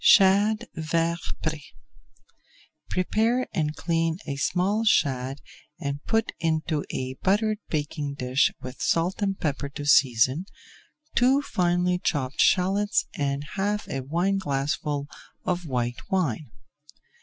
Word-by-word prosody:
SHAD 210 +3 +5
VERT 165 +1 0 0.2
PRÉ 155 -1 -2 1.3
Prepare 225 +7 +1
and 155 -2 -1
clean 165 -1 0
a 140 - -3
small 190 +9 +1
shad 135 - +1 0.4
and 140 +1 -4
put 225 0 +1
into 160 -2 0
a 130 0 -3
buttered 210 +2 +2
baking 145 -2 -2
dish 130 0 +2
with 125 0 -8
salt 175 +5 +1
and 195 -1 0
pepper 140 -2 -2
to 145 +1 -7
season, 130 +4 +4 0.7
two 265 +3 +4
finely 180 -3 +1
chopped 135 -6 -1
shallots 195 +3 +3
and 140 0 -1
half 205 +1 -1
a 135 - -2
wineglassful 145 -3 -1 0.4
of 175 -2 -1
white 120 0 -3
wine. 160 - 0
165 Hz, 115 wpm, -26 LUFS, 140-195 Hz, 1.3 s, SHAD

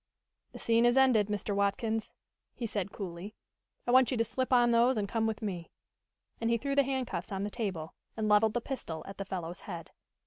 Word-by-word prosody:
"The - - -8
scene 230 0 +3
is 240 +2 +3
ended, 250 -6 +5
Mr. 205 -1 -2
Watkins," 215 +3 0 0.4
he 240 - -4
said 205 -3 -2
coolly. 190 +2 -7 0.5
"I 245 - +1
want 255 -1 +6
you 255 - 0
to 230 - +3
slip 260 +4 -2
on 240 -1 +5
those 235 +2 +4
and 205 -1 0
come 225 +2 0
with 220 0 -3
me." 180 -5 -4 0.7
And 230 - 0
he 235 - +3
threw 275 +4 -2
the 280 - +5
handcuffs 255 -8 -2
on 195 0 -2
the 205 - -3
table, 190 -9 -3 0.2
and 215 -1 0
leveled 210 +1 +4
the 240 - +1
pistol 200 -12 -5
at 195 0 -9
the 195 - -3
fellow's 180 -2 -5
head. 170 -4 -8
220 Hz, 210 wpm, -31 LUFS, 195-240 Hz, 0.7 s, want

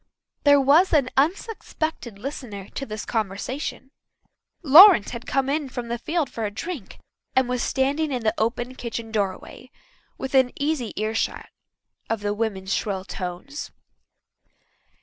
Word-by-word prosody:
There 285 0 +7
was 295 +8 +4
an 275 -5 +3
unsuspected 315 - -2
listener 215 -5 -7
to 275 - -6
this 215 -1 -5
conversation. 225 +6 -3 0.7
Lawrence 330 - +9
had 240 -1 -7
come 270 0 +1
in 285 0 -1
from 245 -2 -6
the 235 0 -2
field 315 +3 -1
for 230 - -6
a 210 - 0
drink, 230 - -7 0.4
and 260 -1 +3
was 250 -1 -1
standing 285 +3 0
in 250 -3 -2
the 215 - +2
open 240 +3 -1
kitchen 230 -2 -6
doorway, 205 +4 -3 0.5
within 265 -1 +2
easy 285 -5 -1
earshot 215 +2 -2 0.6
of 225 -2 -1
the 205 0 -1
women's 200 -3 -2
shrill 195 -3 -2
tones. 185 +12 -6
250 Hz, 135 wpm, -24 LUFS, 215-285 Hz, 0.7 s, Lawrence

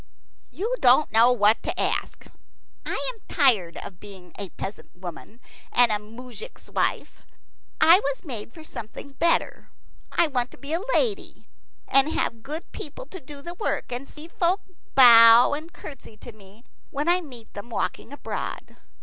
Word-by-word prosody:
"You 455 +6 -2
don't 255 +4 +5
know 230 +3 +6
what 215 -2 +3
to - - -4
ask. - - -2 0.6
I - - -2
am 450 - -22
tired 225 - +3
of 180 - -9
being 190 -3 -10
a 200 -2 -5
peasant 195 +5 -8
woman 180 +5 -9 0.3
and 245 -2 +4
a 210 - 0
moujik's 245 - -11
wife. - - -2 0.6
I 340 +3 +7
was 280 -4 -3
made 230 -6 -6
for 320 +4 -13
something 280 -1 -9
better. 335 +5 0 0.4
I 345 - +3
want 250 -5 -1
to - - -14
be 285 +2 -5
a 335 - 0
lady, 435 -5 -1 0.4
and 275 +2 +4
have 230 -1 -2
good 300 +7 -5
people 310 - -7
to 380 - -9
do 280 -1 -10
the 345 - -5
work, 365 - -3
and 250 +3 -6
see 305 +2 -8
folk 355 +3 0 0.3
bow 235 -2 +9
and 310 +3 -5
curtsy 275 -10 -11
to 240 - -10
me 210 +1 -17 0.3
when 290 +3 -3
I 355 +1 +4
meet 245 -8 -11
them 205 +4 -9
walking 230 +1 -3
abroad. 285 - -6
255 Hz, 165 wpm, -25 LUFS, 225-320 Hz, 0.6 s, bow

